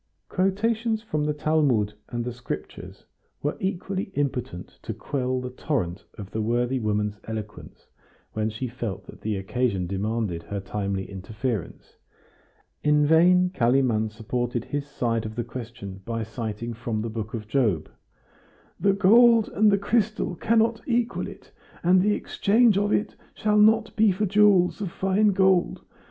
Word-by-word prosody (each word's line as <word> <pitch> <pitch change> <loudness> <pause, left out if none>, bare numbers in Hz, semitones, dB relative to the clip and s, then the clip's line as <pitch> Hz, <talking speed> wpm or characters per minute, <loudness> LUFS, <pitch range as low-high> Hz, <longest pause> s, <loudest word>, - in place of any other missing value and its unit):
Quotations 220 +4 0
from 155 -9 -2
the 150 - 0
Talmud 145 -9 +1 0.2
and 120 -1 -3
the 125 - -3
Scriptures 115 -11 -7 0.4
were 145 - 0
equally 190 0 -3
impotent 125 -10 -3
to - - -5
quell 130 -2 -2
the 125 0 -5
torrent 115 - -3
of 100 -2 -8
the 110 - -2
worthy 120 +4 0
woman's 105 -1 -1
eloquence 110 -2 -8 0.5
when 110 0 -1
she 110 +4 -4
felt 115 -5 -5
that - - -13
the 110 -1 -2
occasion 95 -1 -1
demanded 100 -1 -2
her 100 +3 -5
timely 100 -1 -3
interference; 105 +2 -5 0.9
in 150 0 +4
vain 180 +4 +5
Kalimann 120 - +2
supported 120 +2 -3
his 145 0 -3
side 115 -5 -1
of 110 0 -6
the 120 - -2
question 115 -5 -8
by 115 +2 -3
citing 110 +1 -5
from 115 -2 -3
the 115 - -3
book 110 0 -5
of 105 -2 -6
Job: 110 - +1 0.9
"The 200 +2 +3
gold 225 +3 +6
and 210 0 +3
the 200 - +4
crystal 215 -1 0
cannot 225 +5 +1
equal 240 -1 0
it, - - -12 0.3
and 180 +2 +5
the 210 +2 +2
exchange 225 +1 +3
of 205 +1 +1
it 210 - 0 0.2
shall 210 0 +2
not 220 +1 +4
be 220 -2 +4
for 200 +3 0
jewels 200 -1 +4
of 195 - -2
fine 195 +4 +2
gold. 190 -2 +2
130 Hz, 150 wpm, -25 LUFS, -, 0.9 s, gold